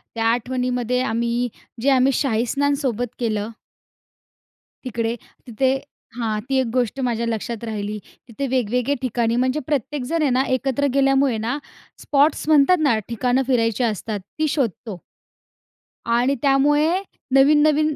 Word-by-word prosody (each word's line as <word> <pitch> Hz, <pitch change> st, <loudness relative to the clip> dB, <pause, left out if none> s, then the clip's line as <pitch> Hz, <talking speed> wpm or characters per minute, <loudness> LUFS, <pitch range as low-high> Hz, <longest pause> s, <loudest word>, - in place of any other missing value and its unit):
त्या 225 Hz, 0 st, -1 dB
आठवणीमध्ये 250 Hz, 0 st, -1 dB
आम्ही 235 Hz, 0 st, 0 dB, 0.3 s
जे 280 Hz, -, +2 dB
आम्ही 265 Hz, 0 st, +4 dB
शाहीस्नान 275 Hz, +3 st, +1 dB
सोबत 245 Hz, -2 st, -1 dB
केलं 215 Hz, -2 st, -1 dB, 1.4 s
तिकडे 230 Hz, -1 st, -2 dB, 0.3 s
तिथे 255 Hz, +3 st, +1 dB, 0.5 s
हां, 220 Hz, -3 st, -1 dB
ती 270 Hz, -, +1 dB
एक 260 Hz, -, 0 dB
गोष्ट 250 Hz, +1 st, 0 dB
माझ्या 235 Hz, 0 st, -1 dB
लक्षात 230 Hz, 0 st, -4 dB
राहिली. 210 Hz, -2 st, -4 dB, 0.3 s
तिथे 265 Hz, +4 st, -4 dB
वेगवेगळे 250 Hz, +1 st, 0 dB
ठिकाणी 235 Hz, -2 st, 0 dB
म्हणजे 255 Hz, +4 st, +1 dB
प्रत्येकजण 295 Hz, +2 st, -1 dB
आहे 295 Hz, -, +2 dB
ना, 255 Hz, +2 st, +2 dB
एकत्र 270 Hz, +2 st, 0 dB
गेल्यामुळे 270 Hz, -3 st, +3 dB
ना 245 Hz, -, -1 dB, 0.4 s
स्पॉट्स 290 Hz, +2 st, +2 dB
म्हणतात 310 Hz, +4 st, +5 dB
ना, 275 Hz, -7 st, +3 dB
ठिकाणं 245 Hz, +3 st, +1 dB
फिरायची 230 Hz, -3 st, +1 dB
असतात 215 Hz, -1 st, -2 dB
ती 310 Hz, +11 st, -3 dB
शोधतो. 225 Hz, -, -3 dB, 1.0 s
आणि 240 Hz, +4 st, +2 dB
त्यामुळे 295 Hz, +5 st, +3 dB, 0.3 s
नवीन-नवीन 300 Hz, +2 st, +4 dB
250 Hz, 125 wpm, -21 LUFS, 230-275 Hz, 1.4 s, म्हणतात